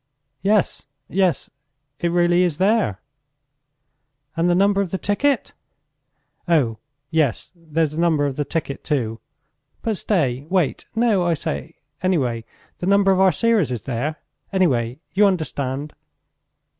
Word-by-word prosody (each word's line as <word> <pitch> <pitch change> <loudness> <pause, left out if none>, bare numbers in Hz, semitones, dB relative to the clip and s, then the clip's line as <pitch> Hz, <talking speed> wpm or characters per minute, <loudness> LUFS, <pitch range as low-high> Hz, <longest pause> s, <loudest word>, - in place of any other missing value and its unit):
"Yes, 200 -6 +1 0.2
yes... 185 -2 0 0.5
it 170 - 0
really 175 +1 +3
is 175 -5 +1
there!" 195 - +1 1.3
"And 170 +1 +2
the 175 - +3
number 200 +1 +3
of 195 - -2
the 190 - -2
ticket?" 265 +9 0 0.9
"Oh, 130 -10 +2 0.3
yes! 155 -7 0
There's 160 -2 -1
the 160 +2 -2
number 160 -4 +2
of 140 -2 -2
the 145 - -1
ticket 145 -2 -4
too. 115 -7 -1 0.6
But 220 -3 -1
stay... 145 - 0
wait! 180 -6 0
No, 225 -5 +3
I 170 -1 +2
say! 70 - -5 0.3
Anyway, 130 -11 0 0.3
the 180 - -3
number 200 0 +4
of 190 - +2
our 190 -1 +6
series 210 - +2
is 120 -5 -4
there! 135 +5 -2 0.4
Anyway, 130 - +1
you 205 +1 +5
understand...." 145 -5 -2
170 Hz, 135 wpm, -22 LUFS, 140-190 Hz, 1.3 s, our